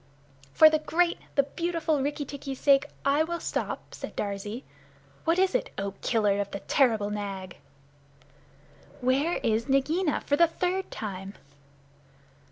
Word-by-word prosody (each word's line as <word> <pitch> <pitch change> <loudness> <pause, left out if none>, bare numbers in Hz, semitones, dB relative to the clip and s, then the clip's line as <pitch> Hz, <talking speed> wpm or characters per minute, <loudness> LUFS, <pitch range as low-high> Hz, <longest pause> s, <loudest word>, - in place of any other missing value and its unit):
"For 315 - +8
the 310 0 +3
great, 340 +3 +1 0.2
the 280 - +5
beautiful 325 0 -1
Rikki 290 +1 -2
tikki's 275 -1 -6
sake 275 -1 +4 0.2
I 280 +2 +3
will 340 +1 -3
stop," - - -4
said - - -7
Darzee. 205 +4 -4 0.6
"What 330 +2 +3
is 375 0 +3
it, - - 0
O 195 0 -2
Killer 205 -3 +2
of 200 - -4
the 200 - -6
terrible 220 -7 +2
Nag?" 195 -3 -5 1.4
"Where 275 +7 +1
is 225 +3 +1
Nagaina, 300 +5 +1
for 285 - +1
the 340 - +6
third 365 +3 -2
time?" 195 -2 -6
275 Hz, 140 wpm, -28 LUFS, 210-325 Hz, 1.4 s, For